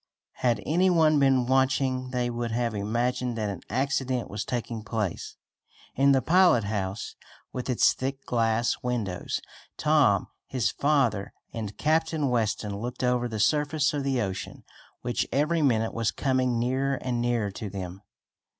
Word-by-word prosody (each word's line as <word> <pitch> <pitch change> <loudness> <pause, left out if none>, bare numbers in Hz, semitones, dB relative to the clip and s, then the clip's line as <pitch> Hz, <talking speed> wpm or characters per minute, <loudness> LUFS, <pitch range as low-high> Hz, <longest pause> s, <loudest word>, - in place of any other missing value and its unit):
Had 120 -2 +1
any 180 +5 +3
one 160 -4 +4
been 135 -2 +4
watching 130 0 +1
they 125 -1 -1
would 120 0 -3
have 115 0 -1
imagined 120 +4 -1
that 105 -2 -1
an 95 - -7
accident 130 0 -1
was 105 +1 -3
taking 115 -1 -4
place. 105 -4 -3 0.6
In 140 +1 +4
the 135 -1 +3
pilot 175 - +5
house, 100 0 -3 0.4
with 125 0 -4
its 125 - +4
thick 135 +1 -4
glass 115 0 +1
windows, 115 -7 -2 0.4
Tom, - - +3 0.2
his 120 -5 0
father 135 -9 +1 0.2
and 110 -3 -5
Captain 160 -2 +1
Weston 110 -3 0
looked 120 +3 -5
over 125 -1 +1
the 110 -2 -5
surface 150 +4 +2
of 145 -1 -1
the 135 -2 0
ocean, 95 -2 -5 0.4
which 120 -1 -1
every 155 +4 +1
minute 115 -6 +2
was 115 -2 0
coming 130 -3 0
nearer 130 +3 0
and 125 -2 -2
nearer 120 -4 0
to 105 +1 -6
them. 95 -1 -6
125 Hz, 150 wpm, -27 LUFS, 110-135 Hz, 0.6 s, pilot